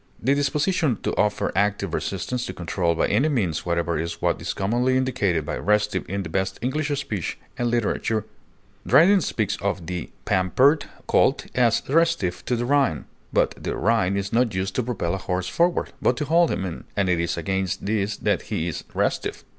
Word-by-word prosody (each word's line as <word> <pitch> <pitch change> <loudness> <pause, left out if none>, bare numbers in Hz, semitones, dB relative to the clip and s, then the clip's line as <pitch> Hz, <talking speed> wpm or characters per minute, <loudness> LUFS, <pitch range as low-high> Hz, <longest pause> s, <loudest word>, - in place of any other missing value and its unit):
The 130 +5 +2
disposition 145 - +1
to - - -1
offer 105 0 +1
active 100 -2 0
resistance 120 +6 -2
to 95 - -5
control 85 -1 -1
by - - +2
any 130 +10 +2
means 95 - -1
whatever 85 -1 0
is 85 +1 -4
what - - 0
is - - -2
commonly 120 +6 +1
indicated 100 - 0
by - - -3
restive 105 -3 +1
in 100 +1 -2
the - - -5
best 95 +3 -1
English 145 +4 -1
speech 100 - -3 0.2
and 120 -1 0
literature. 115 -2 0 0.6
Dryden 190 +5 +6
speaks 105 - -1
of 100 -3 -2
"the 90 -1 -4 0.2
pampered 120 - +3 0.2
colt" - - +2
as 120 -2 +3
"restiff 150 - +1
to 125 - +1
the 120 +1 -1
rein;" 135 - +2 0.3
but - - +2
the - - -2
rein 100 -2 +2
is 100 +1 -3
not 115 -3 +2
used 95 +1 -1
to - - +3
propel 110 -8 -2
a - - -1
horse 90 -1 -2
forward, 170 +1 +1
but - - +2
to 150 - -1
hold 165 +3 +4
him 95 - -2
in, 85 -3 -6
and 100 -2 +2
it 90 -2 +2
is 85 +1 -1
against 95 +3 -2
this 105 0 0
that - - 0
he 80 - -1
is 85 - -4
"restiff." - - -1
105 Hz, 190 wpm, -24 LUFS, 90-125 Hz, 0.6 s, Dryden